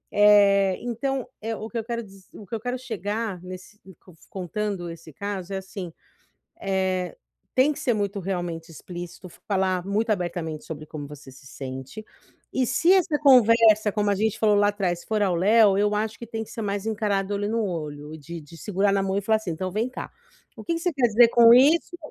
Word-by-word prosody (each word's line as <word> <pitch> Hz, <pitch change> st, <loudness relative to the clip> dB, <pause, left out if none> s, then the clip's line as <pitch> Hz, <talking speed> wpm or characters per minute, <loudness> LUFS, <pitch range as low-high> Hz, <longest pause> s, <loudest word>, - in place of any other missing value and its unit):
Eh, 200 Hz, -2 st, +5 dB
então 245 Hz, +2 st, -3 dB
é 225 Hz, +1 st, -3 dB
o 220 Hz, -, -6 dB
que 235 Hz, -, -5 dB
eu 225 Hz, -, -2 dB
quero 235 Hz, +1 st, -4 dB
diz 195 Hz, -2 st, -17 dB
o 210 Hz, -, -11 dB
que 200 Hz, -, -14 dB
eu -, -, -3 dB
quero 245 Hz, +3 st, -3 dB
chegar 215 Hz, -5 st, -4 dB
nesse 185 Hz, +3 st, -10 dB, 0.2 s
cof 175 Hz, -4 st, -19 dB
contando 190 Hz, -1 st, -4 dB
esse 165 Hz, -1 st, -10 dB
caso 200 Hz, +2 st, -5 dB
é -, -, -1 dB
assim: 190 Hz, -2 st, -7 dB, 0.7 s
eh, 190 Hz, -2 st, -1 dB, 0.4 s
tem 265 Hz, +4 st, +4 dB
que -, -, -9 dB
ser 245 Hz, -, +1 dB
muito 200 Hz, -1 st, -2 dB
realmente 175 Hz, -3 st, -4 dB
explícito, 175 Hz, +2 st, -9 dB, 0.2 s
falar 190 Hz, -3 st, 0 dB
muito 215 Hz, +3 st, 0 dB
abertamente 170 Hz, -5 st, -2 dB
sobre 155 Hz, -1 st, -7 dB
como 145 Hz, -2 st, -7 dB
você 145 Hz, -1 st, -12 dB
se 135 Hz, +1 st, -17 dB
sente. 130 Hz, +9 st, -8 dB, 0.5 s
E 260 Hz, -1 st, +1 dB
se 330 Hz, +9 st, +3 dB
essa 365 Hz, -5 st, +3 dB
conversa 230 Hz, -6 st, +6 dB
como 210 Hz, -1 st, +1 dB
a -, -, +3 dB
gente 215 Hz, +1 st, 0 dB
falou 210 Hz, -2 st, +3 dB
lá 205 Hz, 0 st, +4 dB
atrás 185 Hz, -4 st, -2 dB
for 215 Hz, -1 st, 0 dB
ao 185 Hz, -4 st, +1 dB
léu, 205 Hz, +1 st, +5 dB
eu 205 Hz, +1 st, +2 dB
acho 215 Hz, +1 st, -2 dB
que 235 Hz, -, -8 dB
tem 225 Hz, 0 st, -4 dB
que -, -, -10 dB
ser 225 Hz, -, -6 dB
mais 200 Hz, -1 st, -2 dB
encarado 205 Hz, -2 st, -1 dB
olho 205 Hz, +1 st, -2 dB
no 225 Hz, 0 st, 0 dB
olho, 155 Hz, -4 st, -5 dB
de 170 Hz, +3 st, -8 dB
de 155 Hz, +2 st, -14 dB
segurar 200 Hz, +2 st, 0 dB
na 195 Hz, -, +2 dB
mão 190 Hz, 0 st, -1 dB
e -, -, 0 dB
falar 220 Hz, +2 st, +2 dB
assim: 215 Hz, -5 st, -5 dB
"Então 185 Hz, +3 st, -3 dB
vem 215 Hz, +6 st, -1 dB
cá, 255 Hz, -, -7 dB, 0.5 s
o -, -, -10 dB
que 335 Hz, -, -1 dB
que 330 Hz, -, -3 dB
você 355 Hz, 0 st, 0 dB
quer 265 Hz, -4 st, +2 dB
dizer 230 Hz, +2 st, +6 dB
com 235 Hz, 0 st, +7 dB
isso?" 300 Hz, +8 st, +4 dB
205 Hz, 210 wpm, -25 LUFS, 180-225 Hz, 0.7 s, com